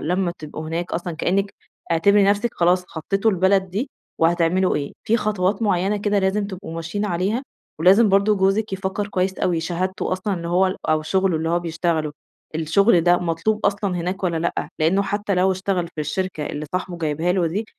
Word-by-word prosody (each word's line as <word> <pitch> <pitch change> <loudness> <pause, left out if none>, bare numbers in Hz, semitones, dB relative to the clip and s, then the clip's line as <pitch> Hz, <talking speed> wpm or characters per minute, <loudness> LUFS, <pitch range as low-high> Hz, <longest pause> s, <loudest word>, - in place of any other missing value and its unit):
لمّا 180 +2 0
تبقوا 155 0 -7
هناك 170 +2 -3
أصلًا 175 0 -3
كأنِك 195 +4 0 0.4
اعتبري 200 +5 +4
نَفسِك 205 +4 +1
خلاص 180 +1 +2
خطّيتوا 195 +7 0
البلد 190 0 +2
دي 230 +9 -3 0.3
وهتعملوا 170 +3 +2
إيه. 140 -1 -4
في 225 - +3
خطوات 210 -1 0
معيّنة 200 0 +1
كده 205 0 +1
لازم 200 +1 +1
تبقوا 190 -4 -8
ماشيين 165 +5 -3
عليها 200 +6 -1 0.4
ولازم 195 +6 +6
برضه 200 +2 +4
جوزِك 195 +2 +1
يفكّر 190 +1 -2
كويس 190 -1 -1
أوي. 170 -3 +1
شهادته 185 +3 -2
أصلًا 190 +2 -1
إن 170 - -6
هو 180 +3 +3
ال 185 - -2
أو 155 0 +2
شُغله 190 +1 +1
اللي 160 +1 -2
هو 170 - +2
بيشتغله، 165 -2 -1 0.4
الشُغل 170 +5 +3
ده 175 +1 +4
مطلوب 180 +6 0
أصلًا 200 -2 0
هناك 185 +3 -3
والّا 170 -2 0
لأ؟ 170 +1 -2
لإنّه 175 +6 +3
حتّى 205 0 -1
لو 185 +1 +3
اشتغل 185 -2 -1
في 155 - -4
الشركة 155 0 -3
اللي 150 +1 -5
صاحبه 180 -1 -3
جايبها 160 +2 0
له 180 -2 +1
دي، 200 +7 -2
185 Hz, 185 wpm, -22 LUFS, 170-200 Hz, 0.4 s, ولازم